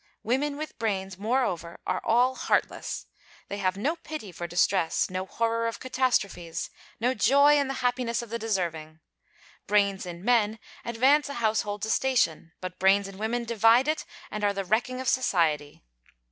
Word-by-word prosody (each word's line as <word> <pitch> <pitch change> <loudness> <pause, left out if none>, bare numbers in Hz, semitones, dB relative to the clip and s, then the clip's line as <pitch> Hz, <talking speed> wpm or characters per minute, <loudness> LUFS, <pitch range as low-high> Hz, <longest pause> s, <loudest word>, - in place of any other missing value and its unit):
Women 280 +5 0
with 310 -3 -7
brains, 195 -4 -2
moreover, 205 -7 -1
are - - -1
all 245 +3 +3
heartless: - - -1 0.4
they 200 - -4
have 185 -1 0
no 295 +11 -1
pity 310 - -7
for 175 0 -6
distress, 175 0 +1
no 185 +1 -3
horror 230 +2 0
of 230 - -4
catastrophes, 205 -10 -1 0.3
no 245 +3 +2
joy 280 +6 +5
in 280 - 0
the 270 - -3
happiness 245 -1 0
of 230 - -11
the 235 - -2
deserving. 170 -8 -3 0.7
Brains 200 -2 +2
in 175 +2 -8
men 225 -3 +3 0.3
advance 265 +6 +3
a 280 - -5
household 215 -3 -1
to 220 - 0
station; 225 -12 +1
but 185 -1 -6
brains 195 +1 +4
in 195 0 -11
women 235 +3 -1
divide 230 +3 +4
it 310 +1 0 0.3
and 210 - -4
are 205 0 +2
the 195 -1 -3
wrecking 240 +6 0
of 260 - -4
society. 160 - +1
220 Hz, 165 wpm, -27 LUFS, 190-255 Hz, 0.7 s, joy